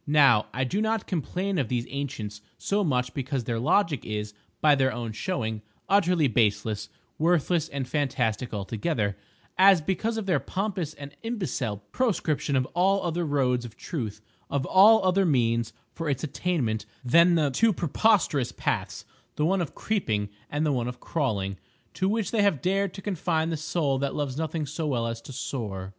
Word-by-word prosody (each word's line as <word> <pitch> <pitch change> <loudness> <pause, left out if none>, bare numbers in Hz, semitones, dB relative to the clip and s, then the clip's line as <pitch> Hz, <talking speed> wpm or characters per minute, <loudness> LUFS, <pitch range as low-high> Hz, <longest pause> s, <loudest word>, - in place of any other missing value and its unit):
Now 135 -8 +5
I 130 - -1
do 190 +11 -1
not 220 -1 0
complain 185 +2 -2
of 135 - 0
these 120 0 -1
ancients 120 -7 -5 0.2
so 205 +1 0
much 125 -6 0
because 135 -1 -2
their 115 0 -2
logic 150 - +2
is, 105 -1 -4 0.3
by 150 -1 +5
their 135 -2 +2
own 120 -2 -4
showing, 110 - -3 0.3
utterly 180 -6 +3
baseless, 105 -2 0 0.3
worthless 165 0 +2
and 140 -2 -4
fantastic 125 -5 -1
altogether, 105 - -2 0.4
as 190 -1 +7
because 195 +8 -1
of 220 - -3
their 175 -7 +2
pompous 185 -5 -3
and 140 0 -10
imbecile 160 - -3
proscription 155 - 0
of 130 -1 +2
all 195 +3 +2
other 170 0 -1
roads 130 -5 +1
of 115 -2 -10
Truth, 110 - -5 0.3
of 140 -1 -1
all 205 +4 +6
other 185 +1 +3
means 115 -7 +1 0.2
for 165 -2 -3
its 135 0 -1
attainment 140 -7 -1 0.2
than 170 +7 +6
the 150 -4 +2
two 225 - +3
preposterous 170 - +2
paths—the 150 - -4
one 190 +2 +2
of 165 - -4
creeping 110 - -1 0.2
and 150 +2 -1
the 150 - +2
one 120 -2 -1
of 125 - -6
crawling—to 110 - -3
which 215 -3 -1
they 225 - +2
have 200 -8 +3
dared 195 0 +1
to 195 - -8
confine 165 -4 0
the - - 0
Soul 150 -3 0
that 140 0 -2
loves 140 -3 -2
nothing 160 0 -2
so 155 +2 -3
well 120 -5 0
as 115 0 -4
to 135 - -10
soar. 105 -8 -4
145 Hz, 170 wpm, -27 LUFS, 120-180 Hz, 0.4 s, as